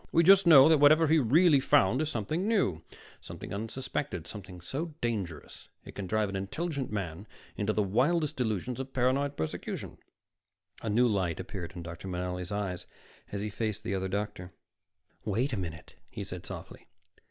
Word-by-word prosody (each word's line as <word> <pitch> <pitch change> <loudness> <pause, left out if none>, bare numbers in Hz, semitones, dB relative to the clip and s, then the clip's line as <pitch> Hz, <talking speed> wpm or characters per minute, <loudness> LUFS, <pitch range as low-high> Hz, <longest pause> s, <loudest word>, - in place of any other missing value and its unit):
We 170 - +4
just 195 +1 +7
know 140 -4 +9
that 160 -2 +5
whatever 155 +3 +6
he 160 +1 +4
really 150 +4 +5
found 125 0 +3
is 155 - -1
something 155 - -2
new, 190 - +1 0.4
something - - -8
unsuspected; 115 - -4
something 95 -4 -9
so 145 - -5
dangerous 100 -10 -4 0.2
it - - -10
can 100 -2 -5
drive 110 +1 +1
an 95 - -5
intelligent 140 - -3
man 100 -1 -4 0.3
into 105 +1 0
the 105 -1 +1
wildest 145 - +1
delusions 120 +1 -2
of 135 0 -6
paranoid 135 +3 +1
persecution." 80 - -5 0.8
A 115 - -3
new 120 +4 +4
light 95 -6 0
appeared 95 -4 -6
in 85 - -6
Dr. 85 +2 -8
Manelli's 90 0 -3
eyes 100 -3 -3 0.4
as 100 - -3
he 105 0 -3
faced 110 -1 -3
the - - -2
other 95 0 -1
doctor. 95 -2 -4 0.7
"Wait 120 +6 0
a - - +1
minute," 80 -3 -6 0.2
he - - -6
said - - -7
softly. - - -9
110 Hz, 170 wpm, -30 LUFS, 95-140 Hz, 0.8 s, know